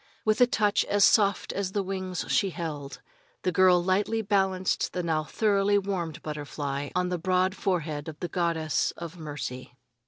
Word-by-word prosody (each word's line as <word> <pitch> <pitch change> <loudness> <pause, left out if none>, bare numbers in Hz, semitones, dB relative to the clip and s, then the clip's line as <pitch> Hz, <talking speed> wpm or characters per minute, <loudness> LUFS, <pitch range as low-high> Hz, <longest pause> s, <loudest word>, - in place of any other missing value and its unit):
With 215 +2 +2
a 245 - +7
touch 215 -5 +2
as 205 -1 +4
soft 200 -3 +3
as 195 -1 -3
the 200 - 0
wings 185 -1 -4
she 195 - +2
held, 150 -5 -6 0.4
the 185 - +1
girl 180 0 +5
lightly 205 +4 +1
balanced 190 -2 0
the 180 - -2
now 160 -2 0
thoroughly 205 +1 +2
warmed 185 -6 -3
butterfly 145 -2 -4
on 180 0 +1
the 180 -1 -2
broad 185 +2 +1
forehead 160 -7 -2
of 155 -1 -8
the 175 - -3
Goddess 170 -3 0
of 170 +1 -8
Mercy. 130 -5 -6
180 Hz, 165 wpm, -27 LUFS, 160-195 Hz, 0.4 s, a